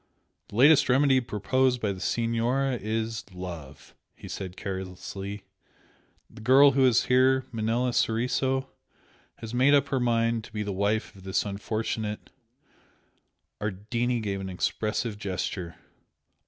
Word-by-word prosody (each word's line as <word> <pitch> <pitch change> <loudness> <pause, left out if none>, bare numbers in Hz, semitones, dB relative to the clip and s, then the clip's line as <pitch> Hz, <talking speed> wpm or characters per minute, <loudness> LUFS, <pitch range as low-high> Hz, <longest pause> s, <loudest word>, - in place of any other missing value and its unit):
"The - - -12
latest 140 +5 +6
remedy 135 0 +4
proposed 125 +3 +1
by 105 -3 -1
the 95 - -6
Signora 120 +6 0
is 110 0 -2
love!" 85 -7 -8 0.2
he - - -11
said, 95 -1 -6
carelessly 95 +1 -6 0.8
"The - - -14
girl 135 +5 +7
who 135 0 +4
is 125 -1 +4
here, 130 +1 +3
Manella 115 +2 0
Soriso 130 +4 0 0.7
has 115 0 -8
made 130 +4 +5
up 140 -1 +2
her 135 - 0
mind 115 -1 +1
to - - -14
be 105 -1 -3
the 100 -1 -3
wife 100 +3 -1
of 95 - -14
this 95 +2 -1
unfortunate 105 +1 -3 0.6
" - - -43
Ardini 115 +4 -1
gave 100 -2 -3
an 95 - -5
expressive 105 +4 -2
gesture. 90 -3 -4
115 Hz, 135 wpm, -27 LUFS, 100-125 Hz, 0.8 s, girl